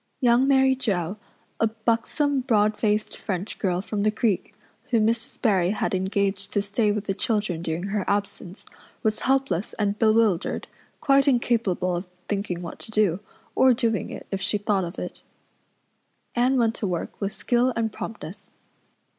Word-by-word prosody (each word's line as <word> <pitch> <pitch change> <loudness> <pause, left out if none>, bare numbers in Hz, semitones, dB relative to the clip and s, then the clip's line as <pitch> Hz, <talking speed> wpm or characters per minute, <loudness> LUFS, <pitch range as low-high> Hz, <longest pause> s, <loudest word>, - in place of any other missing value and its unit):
Young 245 +1 +4
Mary 265 -1 +5
Joe, 195 -7 -1 0.4
a 225 - +4
buxom, 230 +6 0
broad 215 -5 +2
faced 210 0 0
French 190 0 -4
girl 180 -3 0
from 205 +1 -3
the 215 - +3
creek, 215 -2 -1 0.3
whom 225 -4 +3
Mrs. 230 0 -1
Barry 190 -7 +3
had 205 - -1
engaged 195 +1 0
to 205 - +1
stay 205 +1 +1
with 205 -1 -2
the 195 - -1
children 205 -5 -1
during 165 0 -3
her 200 0 -1
absence, 200 -2 -2 0.4
was 215 -1 +1
helpless 260 -9 0
and 205 -1 -1
bewildered, 220 -5 +2 0.3
quite 275 -2 +4
incapable 230 -8 +1
of 175 +2 -4 0.2
thinking 195 -4 -2
what 170 - -7
to - - -8
do, 210 -5 +2 0.3
or 260 -2 +5
doing 225 -4 0
it - - -8
if 195 -1 -2
she 205 +2 +1
thought 205 -2 0
of 170 +3 -8
it. - - -6 1.1
Anne 250 +2 +2
went 230 -2 +3
to 205 - -2
work 175 +2 -4
with 200 0 -1
skill 245 +3 +1
and 225 -2 -1
promptness. 205 -4 -8
210 Hz, 165 wpm, -25 LUFS, 195-230 Hz, 1.1 s, Mary